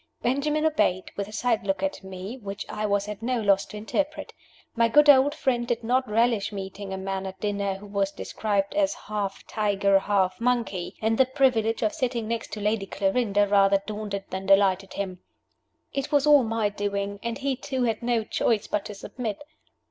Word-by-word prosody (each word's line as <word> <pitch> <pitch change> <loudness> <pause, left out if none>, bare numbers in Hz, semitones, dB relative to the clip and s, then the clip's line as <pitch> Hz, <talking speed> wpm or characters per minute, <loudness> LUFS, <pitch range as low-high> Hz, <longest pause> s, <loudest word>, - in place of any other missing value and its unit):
Benjamin 295 +5 +1
obeyed 185 - +1
with 200 -1 -3
a - - -11
side 230 0 0
look 195 +7 0
at 290 -7 -2
me, 190 +4 -7
which 200 -2 -6
I 210 0 -3
was 200 0 0
at 210 0 -6
no 245 +1 0
loss 200 -2 +3
to 210 - -8
interpret. 285 +8 -3 0.4
My 230 -1 +4
good 295 +6 +5
old 280 +2 +4
friend 250 -5 0
did 240 -2 -1
not 255 +2 +1
relish 225 -1 +2
meeting 195 0 -6
a 190 - -3
man 195 0 -3
at 190 0 -8
dinner 200 -2 -1
who 195 +2 -10
was 200 -1 0
described 200 0 -2
as 300 -1 +1
"half 205 -2 -4
tiger, 200 -2 +2
half 195 0 0
monkey;" 235 -7 -1
and 225 +2 +1
the 265 - +5
privilege 250 -5 +2
of 215 - +1
sitting 240 -4 -2
next 230 0 -3
to 215 - -4
Lady 210 -1 0
Clarinda 205 +1 +1
rather 195 -1 +4
daunted 205 -2 -4
than 190 0 -4
delighted 195 -1 +3
him. 185 -2 -4 0.7
It 275 +2 -3
was 290 -1 +3
all 295 -2 +7
my 225 -2 0
doing, 200 0 -3
and 235 -1 -3
he 275 -1 -1
too 260 0 -3
had 225 -2 0
no 235 -2 +1
choice 215 0 0
but 210 - -2
to 210 - -7
submit. 220 +3 -5
210 Hz, 195 wpm, -26 LUFS, 200-245 Hz, 0.7 s, all